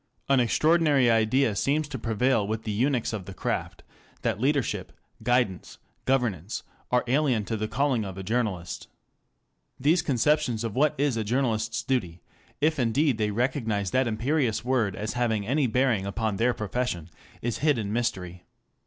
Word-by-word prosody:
An 135 -1 +4
extraordinary 145 0 +3
idea 115 +1 +2
seems 145 +7 +1
to 135 -3 -5
prevail 115 -1 +1
with 110 +1 -3
the 110 - -3
eunuchs 120 +2 0
of 100 -4 -4
the 95 - -9
craft, - - -3 0.4
that - - 0
leadership, 140 0 0 0.3
guidance, 120 -5 0 0.3
governance, 115 - 0 0.3
are 125 0 +2
alien 130 -4 +1
to 115 - -2
the 110 0 -2
calling 130 -2 +1
of 95 -2 -7
a 95 - -5
journalist. 105 -6 -2 0.9
These 160 +4 +3
conceptions 140 -4 +1
of 115 -3 -3
what 145 +3 +3
is 140 -4 +1
a 110 - 0
journalist's 110 -1 0
duty, 90 -10 -2 0.4
if 155 +1 +2
indeed 125 +1 +2
they 105 -1 +1
recognize 115 -4 -1
that 130 -1 +2
imperious 120 0 0
word 120 -7 +1
as 110 +2 -3
having 115 -4 0
any 135 +4 +1
bearing 120 -5 +1
upon 105 0 -2
their 120 +3 +2
profession, 105 -6 -3 0.3
is 120 -1 -2
hid 150 -3 +3
in 105 -2 -3
mystery. 90 -7 -3
120 Hz, 160 wpm, -27 LUFS, 105-135 Hz, 0.9 s, An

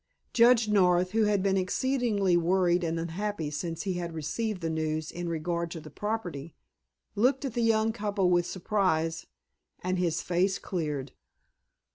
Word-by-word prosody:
Judge 235 -2 +5
North, 180 -3 +3
who 220 0 +2
had 205 -2 +1
been 195 -1 +2
exceedingly 205 -1 +1
worried 175 +1 +2
and 165 0 -1
unhappy 170 -1 -3
since 165 +2 -4
he 195 -3 -1
had 170 -2 -4
received 195 +6 -3
the 165 - -1
news 155 0 -2
in 175 0 -4
regard 170 +1 -2
to 165 - -6
the 155 -1 -12
property, 175 -6 -4 0.6
looked 255 +6 +2
at 260 - -3
the 240 - -1
young 225 -1 +2
couple 205 -4 0
with 175 0 +3
surprise, 165 -4 0 0.6
and 185 0 0
his 170 -2 0
face 185 +2 +1
cleared. 150 -7 -3
180 Hz, 155 wpm, -28 LUFS, 165-210 Hz, 0.6 s, Judge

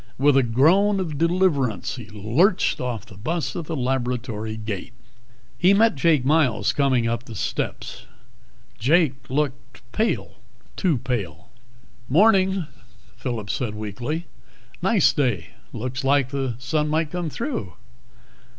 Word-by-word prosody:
With 140 +1 +4
a 135 - +6
groan 165 - +3
of 160 -6 -3
deliverance 150 - +1
he 115 -4 -9
lurched 120 - +1
off 120 -3 -3
the 105 -5 -14
bus 160 - -2
at 170 - -4
the 160 - -4
laboratory 125 -4 -2
gate. 105 -2 -5 0.7
He 185 +3 +5
met 225 +2 +4
Jake 150 -2 +2
Miles 135 -8 +2
coming 130 -5 +2
up 115 +1 -2
the 115 - -9
steps. - - -4 0.7
Jake 140 +1 +2
looked 140 -3 -3
pale, 220 +1 -1 0.4
too 175 -8 +1
pale. 100 -9 -4 0.6
"Morning," 190 - +4 0.5
Phillip 115 -5 -4
said 120 -6 -3
weakly. 120 - -4 0.6
"Nice 215 -7 +4
day. 125 -10 -1 0.2
Looks 130 +3 -4
like 135 -1 +3
the 135 -3 -2
sun 150 +5 -1
might 155 0 0
come 175 -2 -2
through." 150 - -4
135 Hz, 130 wpm, -23 LUFS, 115-165 Hz, 0.7 s, a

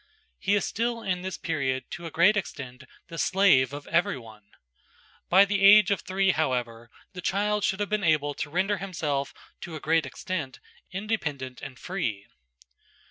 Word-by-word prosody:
He 200 - +2
is 205 - +1
still 230 +1 -2
in 180 -2 -1
this 185 0 -5
period 135 -5 -1
to 170 0 -6
a - - -5
great 175 +7 +4
extent 135 -9 -5 0.2
the 165 -1 -7
slave 180 -10 +4
of 145 0 -7
everyone. 115 - -2 0.8
By 190 +3 +7
the 200 -1 -1
age 200 0 +8
of 200 - +1
three, 190 +1 +1
however, 120 -7 -2 0.2
the 180 - -7
child 205 +3 0
should 190 0 0
have 205 - -1
been 210 -1 0
able 150 -3 +2
to 145 - -5
render 190 +6 0
himself 155 -7 -2 0.3
to 170 - -7
a - - -5
great 160 +1 +1
extent 155 -9 -5 0.3
independent 155 - -3
and 130 - -8
free. 115 - -3
170 Hz, 165 wpm, -27 LUFS, 140-195 Hz, 0.8 s, age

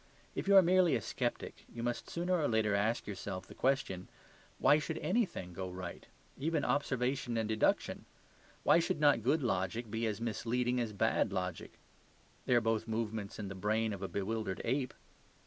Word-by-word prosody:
If - - -4
you 200 - +6
are 190 - +9
merely 180 -3 +4
a - - +1
sceptic, - - -3
you 115 0 -6
must 120 0 -2
sooner 175 +2 0
or 145 - +2
later 110 -2 +2
ask 110 +4 +1
yourself 95 -2 -5
the - - -12
question, 130 -9 0 0.5
"Why 150 - +5
should 140 - -3
ANYTHING 170 - -1
go 95 +1 -4
right; 90 -1 -7 0.3
even 155 +1 0
observation 130 -3 0
and 110 -1 0
deduction? 110 0 +1 0.6
Why - - +6
should 165 - 0
not 145 -6 +5
good 140 +6 +2
logic 110 +2 -1
be 115 +1 0
as 105 -1 -2
misleading 120 +2 0
as 115 -3 -1
bad 105 -1 +1
logic? 90 -3 -3 0.7
They 125 - +4
are 120 - +5
both 115 0 0
movements 110 -2 -3
in 105 - -4
the 100 - -5
brain 110 +3 0
of 100 - -7
a 95 - -2
bewildered 100 -1 -2
ape?" 130 +2 -1
115 Hz, 180 wpm, -34 LUFS, 100-135 Hz, 0.7 s, are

